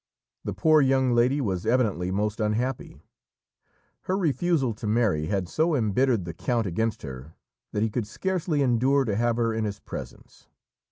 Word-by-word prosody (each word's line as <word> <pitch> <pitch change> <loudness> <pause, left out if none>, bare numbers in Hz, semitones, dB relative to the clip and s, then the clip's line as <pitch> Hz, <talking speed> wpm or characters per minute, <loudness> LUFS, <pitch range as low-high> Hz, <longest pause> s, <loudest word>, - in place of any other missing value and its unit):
The - - -3
poor 155 -1 +4
young 130 -1 +3
lady 125 +4 +3
was 95 -9 -1
evidently 110 -8 +1
most 105 +3 -1
unhappy. 115 +4 -2 1.0
Her 185 - 0
refusal 165 - +1
to 110 0 -6
marry 105 -9 +1
had 95 -1 -1
so 160 - +1
embittered 115 -2 +1
the 85 - -5
count 115 +6 -1
against 110 +5 -2
her 65 +2 -9 0.4
that 105 - 0
he 110 - 0
could 115 -2 -2
scarcely 170 - -1
endure 130 +2 +2
to 105 -4 -1
have 120 +2 +1
her 115 -1 +1
in 110 0 -1
his 100 -2 -3
presence. - - -10
115 Hz, 165 wpm, -26 LUFS, 105-135 Hz, 1.0 s, poor